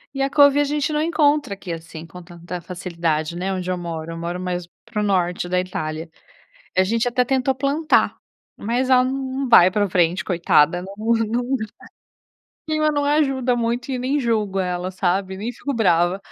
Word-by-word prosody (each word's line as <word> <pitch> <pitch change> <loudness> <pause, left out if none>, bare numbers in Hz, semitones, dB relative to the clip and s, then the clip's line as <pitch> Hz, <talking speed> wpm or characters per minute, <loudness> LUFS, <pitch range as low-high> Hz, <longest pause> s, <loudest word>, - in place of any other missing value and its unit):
E 275 - -2
a 270 - +1
couve 285 0 +5
a - - +4
gente 290 +1 -1
não 300 - +1
encontra 295 -6 +2
aqui, 190 -2 -8
assim, 165 0 -9
com 180 +2 -11
tanta 175 0 -8
facilidade, 170 -3 -3
né, 185 +2 -2
onde 185 -1 -3
eu 180 - -1
moro. 165 -2 -5
Eu 165 - -6
moro 170 +2 -4
mais 180 -1 -3 0.2
para 230 -2 -4
o - - 0
norte 180 -3 0
da 180 0 +1
Itália. 160 -3 -4 0.7
A 185 - +6
gente 230 +5 0
até 250 +1 +1
tentou 265 +1 +1
plantar, 280 +4 +1 0.4
mas 245 +4 -1
ela 255 -1 +5
num 265 0 -3
num 265 - -2
vai 180 -6 +8
pra 205 0 0
frente 175 0 +1
coitada. 170 -2 +3
Ela 180 - -6
num 220 +2 -1
num 235 +3 -1
O - - 0 1.1
clima 310 0 +1
não 290 -1 0
ajuda 270 -4 +1
muito 240 +2 -2
e 255 - -2
nem 260 +4 0
julgo 215 -5 0
ela 180 0 -2
sabe, 190 +1 -1
nem 220 +5 -4
fico 280 +4 -4
brava. 175 -4 +2
205 Hz, 195 wpm, -21 LUFS, 175-260 Hz, 1.1 s, vai